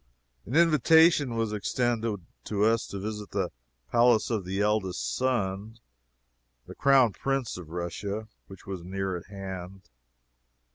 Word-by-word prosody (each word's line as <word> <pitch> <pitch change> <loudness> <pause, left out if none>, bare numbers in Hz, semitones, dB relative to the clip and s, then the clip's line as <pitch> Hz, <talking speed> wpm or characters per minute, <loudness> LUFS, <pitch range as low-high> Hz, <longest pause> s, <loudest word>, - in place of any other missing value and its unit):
An 125 - -3
invitation 160 -4 +5
was 115 -2 -1
extended 110 -2 -1 0.2
to 105 -1 0
us 115 +1 +2
to 100 - -6
visit 105 +1 -5
the 95 -3 -2 0.4
palace 120 -1 +4
of 105 -5 -1
the 95 +2 -3
eldest 95 - 0
son, 110 -4 -1 0.9
the - - -10
Crown 135 -6 +4
Prince 135 0 -2
of 90 -4 -9
Russia, 100 +5 -4 0.2
which 95 -1 -13
was 95 -3 -6
near 95 +1 -3
at 85 - -8
hand. 95 -3 -8
105 Hz, 135 wpm, -28 LUFS, 95-120 Hz, 0.9 s, invitation